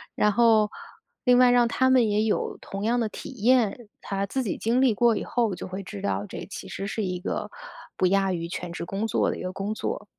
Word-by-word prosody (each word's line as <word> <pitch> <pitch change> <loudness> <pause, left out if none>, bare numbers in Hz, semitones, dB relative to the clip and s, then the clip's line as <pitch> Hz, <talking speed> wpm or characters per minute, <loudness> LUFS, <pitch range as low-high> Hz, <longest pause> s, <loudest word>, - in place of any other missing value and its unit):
然 210 - +3
后 220 -1 +4 0.5
另 250 -1 +5
外 250 0 +6
让 245 -1 +4
他 260 +2 +2
们 250 -4 +4
也 210 +1 +2
有 220 - -1
同 195 +1 -6
样 235 +3 +1
的 230 - +1
体 210 - -8
验， 240 -2 +3
他 195 0 -2
自 260 +6 -2
己 210 - -3
经 235 +3 +1
历 260 -4 +4
过 235 +1 +3
以 - - -3
后 230 -6 0
就 - - -7
会 190 +1 -5
知 100 - -8
道 100 0 -1
这 - - -7
其 - - -8
实 195 - -5
是 215 +2 -2
一 180 -2 -2
个， 180 - -3 0.5
不 - - +1
亚 195 0 +2
于 170 -1 -3
全 175 0 -5
职 - - -5
工 200 +5 -2
作 - - +1
的 - - -3
一 - - -7
个 185 - -3
工 195 +3 -3
作。 210 -1 -4
210 Hz, 260 characters per minute, -26 LUFS, 195-240 Hz, 0.5 s, 外